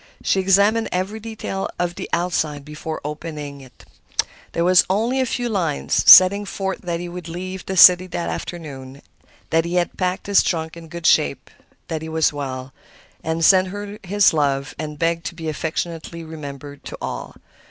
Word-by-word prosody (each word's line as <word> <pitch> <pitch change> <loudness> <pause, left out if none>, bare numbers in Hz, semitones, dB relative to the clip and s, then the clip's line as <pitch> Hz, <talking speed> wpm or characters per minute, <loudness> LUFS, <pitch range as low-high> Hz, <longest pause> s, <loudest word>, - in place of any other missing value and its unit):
She 195 - +2
examined 200 +4 +3
every 190 +4 -2
detail 215 -3 -5
of 175 -1 -1
the - - -7
outside 160 -4 -1
before 155 +1 -6
opening 150 -2 -6
it. 130 -2 -17 0.7
There 170 - 0
were 180 - +3 0.2
only 230 +7 +1
a 260 - 0
few 245 0 -2
lines, 175 -10 0
setting 195 +2 +9
forth 195 -1 -4
that 170 -2 -3
he 175 - -5
would 175 -1 -8
leave 185 +2 -6
the 190 - -3
city 180 +1 +8
that 175 -1 -4
afternoon, 140 -5 -7 0.5
that 165 0 +3
he 170 +1 -4
had 175 -1 0
packed 185 0 -1
his 200 -1 +4
trunk 160 -2 -2
in 165 -1 -11
good 170 +1 -8
shape, 70 - +2 0.4
that 160 -1 -4
he 160 - -6
was 160 -1 +1
well, 130 -2 -5 0.5
and 160 +1 0
sent 185 +1 +6
her 205 +2 -7
his 200 0 +3
love 140 -2 0
and 150 -1 -5
begged 165 +1 0
to - - -7
be 165 -1 -6
affectionately 165 +1 -4
remembered 145 -3 -9
to - - -7
all. - - -6
170 Hz, 175 wpm, -21 LUFS, 155-190 Hz, 0.7 s, setting